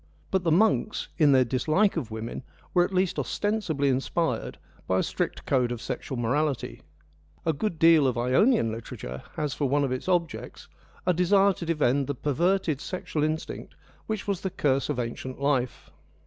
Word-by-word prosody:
But 190 -2 +1
the 165 - +2
monks, 215 +4 +2
in 150 -3 +6
their 130 -2 +5
dislike 155 - +2
of 145 -9 -3
women, 110 +2 -5 0.3
were 175 - +5
at 180 - -2
least 185 -1 +1
ostensibly 205 -10 -1
inspired 135 +5 -1 0.3
by 95 - +2
a - - +2
strict - - -3
code 125 -3 +2
of 120 - -3
sexual 125 +2 -5
morality: 135 +4 -1 0.6
a 160 - +2
good 170 +3 -2
deal 160 -3 +6
of 125 -2 -1
Ionian 125 - +3
literature 65 - -7
has 150 -3 -2
for 140 -3 -1
one 145 +1 +2
of 135 - -1
its 130 +8 -3
objects 175 -3 -2 0.4
a 180 - +3
desire 195 +3 +4
to 170 - -7
defend 145 -4 +1
the 145 - -2
perverted 160 +2 0
sexual 170 -4 -3
instinct 155 +1 -3 0.3
which 215 -2 -3
was 200 -3 -1
the 190 - -2
curse 140 -5 0
of 145 - -1
ancient 125 +2 -4
life. 125 - -1
150 Hz, 175 wpm, -27 LUFS, 130-180 Hz, 0.6 s, in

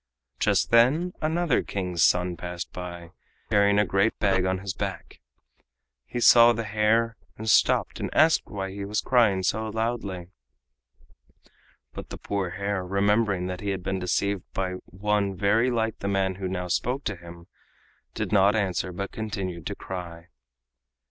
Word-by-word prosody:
Just - - +1
then 140 +10 +4
another 160 -2 +1
King's 90 -4 -2
son 90 0 +2
passed 90 -1 -6
by, 85 -1 -8 0.4
carrying 100 -1 +4
a 105 - +4
great 100 +4 +1
bag 95 -3 +2
on 95 0 0
his 95 0 -5
back. 100 -2 -6 0.9
He 120 - -4
saw 120 0 +7
the 115 0 -3
hare, 110 +2 +1 0.2
and 110 - -7
stopped 110 - +3
and - - -3
asked 160 +1 +3
why 95 -2 -5
he 100 +1 -6
was 105 +2 -1
crying 110 -7 +3
so 110 +3 -1
loudly. 105 -5 -3 1.6
But - - -8
the - - -7
poor 100 -3 -3
hare, 100 +1 -3
remembering 100 0 +1
that 90 0 -5
he 100 - -3
had 95 -2 -3
been 95 +1 -2
deceived 95 +2 0
by 95 -1 -1
one 100 0 -1
very 105 +6 +2
like 115 -2 -1
the 100 - -4
man 95 -1 +1
who 95 -1 -3
now 90 -1 -3
spoke 125 +9 -1
to 105 - -3
him, 85 -1 -12 0.7
did - - -3
not 100 +1 +4
answer, 95 -3 -1
but 100 +3 -5
continued 95 -6 -5
to 100 - -4
cry. 85 -3 -8
100 Hz, 160 wpm, -26 LUFS, 90-110 Hz, 1.6 s, saw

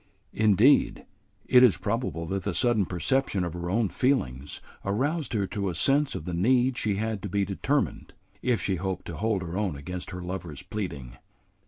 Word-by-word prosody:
Indeed, 110 +6 +4 0.4
it 125 -1 +6
is 125 -7 +6
probable 95 -3 -2
that 95 +3 -2
the - - -3
sudden 120 -6 +2
perception 95 - 0
of 85 -2 -3
her 85 0 -4
own 110 +3 +2
feelings 75 - -1 0.2
aroused 140 +11 -1
her 100 -3 +1
to 100 0 -2
a 85 - -4
sense 135 - +2
of 75 - -5
the 90 - -4
need 125 +8 +3
she 105 -4 0
had 110 0 -2
to 100 - -5
be 100 +2 +1
determined, 135 +9 -1 0.3
if 125 -3 +1
she 95 -2 -1
hoped 95 0 -3
to 85 - -6
hold 105 -4 0
her 85 0 -5
own 100 -6 -1
against 90 +6 -6
her 90 -1 -6
lover's 90 -5 -6
pleading. 70 - -5
100 Hz, 185 wpm, -27 LUFS, 90-120 Hz, 0.4 s, it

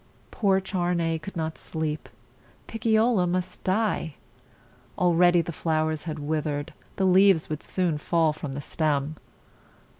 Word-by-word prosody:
Poor 195 -3 +2
Charney 175 -4 -1
could 195 +6 -9
not 160 -1 -3
sleep. 155 -1 -4 0.6
Picciola 220 -3 +2
must 180 +1 -3
die. 190 -6 0 0.8
Already 175 -1 +4
the 170 - -5
flowers 155 -1 -1
had 155 -2 -4
with 150 +1 -2
ered; 145 -1 -3 0.3
the 190 - +1
leaves 190 -2 +5
would 155 - -3
soon 175 -5 -1
fall 160 0 +2
from 150 -2 -6
the 140 - -5
stem. 150 0 -1
165 Hz, 130 wpm, -26 LUFS, 155-185 Hz, 0.8 s, leaves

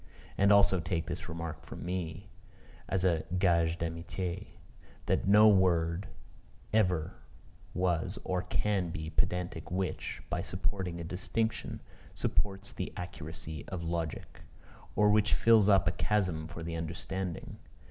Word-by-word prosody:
And 100 +1 +4
also 100 -2 +6
take 85 -1 -1
this 85 +2 -5
remark 80 -1 -5
from - - -8
me, 90 +1 -4 0.6
as 95 -1 +1
a 85 -4 +2
gage 85 -3 +3
d'amitié 85 +3 -4 0.6
that - - +1
no 105 +2 +8
word 90 -2 +3 0.7
ever 90 -7 +2 0.6
was 90 -3 0
or 90 -1 0
can 95 0 0
be 80 -1 -5
pedantic 90 -2 -1
which, 95 +1 -3
by - - -1
supporting 90 -4 -3
a - - -4
distinction, 95 +6 -2 0.3
supports 100 -1 -1
the - - -4
accuracy 80 -3 -6
of 90 -3 -4
logic; 85 -1 -4 0.5
or 105 0 +5
which 105 0 +4
fills 110 -3 +5
up 95 -4 +5
a - - +4
chasm 90 -6 0
for 80 0 -7
the 85 0 -4
understanding. 85 +2 -4
90 Hz, 130 wpm, -31 LUFS, 85-95 Hz, 0.7 s, no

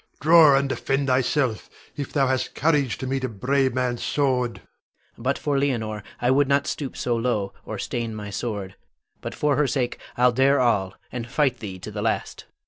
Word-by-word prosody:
Draw 155 -2 +7
and 140 0 +1
defend 135 +1 -1
thyself, 130 -2 +1 0.3
if 140 -2 -5
thou 140 -2 +2
hast 130 -1 -1
courage 145 -6 +1
to - - -5
meet 135 0 -2
a 130 - -1
brave 130 +4 0
man's 125 -2 -1
sword! 125 -4 +1
Adrian. - - -15 0.6
But 130 +4 0
for 145 -2 0
Leonore 110 -7 -1 0.2
I 125 +1 +2
would 140 +1 +3
not 140 +1 +2
stoop 140 -4 -4
so 120 - 0
low, 115 -4 -1
or - - -5
stain 115 -2 -3
my 105 -1 -6
sword; 100 -4 -4 0.5
but - - -6
for 145 -2 +1
her 150 -1 +3
sake 125 -3 -1 0.2
I'll 125 0 +5
dare 135 +3 +3
all, 100 -7 +1 0.2
and 120 -2 -5
fight 130 -3 +1
thee 95 -4 -6
to 105 +4 -8
the 105 0 -4
last. 110 +1 -2
130 Hz, 195 wpm, -24 LUFS, 115-140 Hz, 0.6 s, Draw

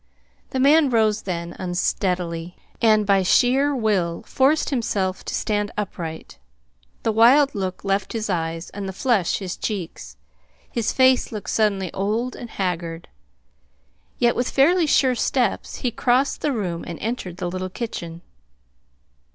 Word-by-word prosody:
The 260 - -2
man 290 +2 +5
rose 220 -3 +2
then, 170 -3 -4
unsteadily, 175 -1 -2 0.3
and 215 -2 +4
by 195 -1 +4
sheer 265 +9 +3
will 195 -8 0
forced 285 +4 +2
himself 195 -7 -1
to - - -3
stand 205 -1 -1
upright. 170 -6 -5 0.6
The 225 - +2
wild 255 +6 +5
look 190 -2 -4
left 195 0 -1
his 220 -2 -2
eyes, 165 -2 -3
and 195 -1 -5
the - - -6
flush 210 -4 +1
his 190 -3 -5
cheeks. 165 - -5 0.5
His 230 -2 -1
face 260 -1 +3
looked 210 -3 -5
suddenly 200 -4 0
old 220 +6 -1
and 240 - -8
haggard. 170 -4 -3 1.1
Yet 240 -1 +2
with 245 - 0
fairly 325 +5 +3
sure 265 -3 +4
steps 245 -2 -1
he 245 - -2
crossed 250 +4 +1
the 295 - +1
room 180 -9 -3
and 170 -2 -6
entered 210 -6 -4
the 180 - -3
little 185 +1 -4
kitchen. 170 -6 -6
205 Hz, 145 wpm, -22 LUFS, 180-245 Hz, 1.1 s, man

